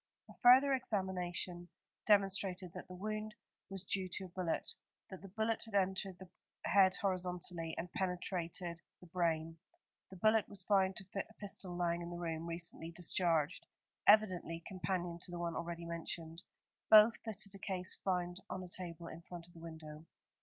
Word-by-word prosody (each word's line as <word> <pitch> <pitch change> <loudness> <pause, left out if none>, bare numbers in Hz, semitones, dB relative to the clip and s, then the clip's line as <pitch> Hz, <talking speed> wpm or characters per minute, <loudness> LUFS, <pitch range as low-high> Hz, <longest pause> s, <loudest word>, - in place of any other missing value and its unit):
A - - -17
further 260 +3 +8
examination 180 -6 -2 0.4
demonstrated 195 -3 +3
that - - -8
the 185 - -8
wound 215 +2 -4 0.3
was 195 -1 -2
due 185 0 0
to - - -2
a - - -10
bullet; 175 -2 -1 0.4
that 190 - -8
the 195 - -9
bullet 220 +3 0
had 225 -3 -6
entered 190 -1 +1
the 190 +1 -11 0.4
head 190 -1 +6
horizontally 180 -3 -2
and 175 +1 -5
penetrated 180 -3 -2 0.2
the - - -14
brain. 165 -2 0 0.5
The 190 - -10
bullet 215 +3 +3
was 200 -2 -1
found 190 -1 +3
to 190 - -5
fit 195 - -2
a 220 - -18
pistol 195 -3 -3
lying 170 -1 +1
in 170 - -5
the 175 - -5
room, 165 -1 -3
recently 165 -1 -2
discharged, 170 -1 +1 0.4
evidently 185 -6 +4
companion 180 -2 -2
to 180 - -7
the 175 - -5
one 170 -1 -2
already 170 0 -4
mentioned. 165 0 -5 0.5
Both 215 +1 +9
fitted 205 -2 -4
a 195 - -8
case 185 -1 -1
found 180 -1 -1
on 185 - -4
a 180 - -9
table 170 -2 -6
in 165 0 -8
front 170 -1 -9
of 175 - -17
the 165 - -12
window. 160 -1 -9
180 Hz, 170 wpm, -36 LUFS, 170-195 Hz, 0.5 s, Both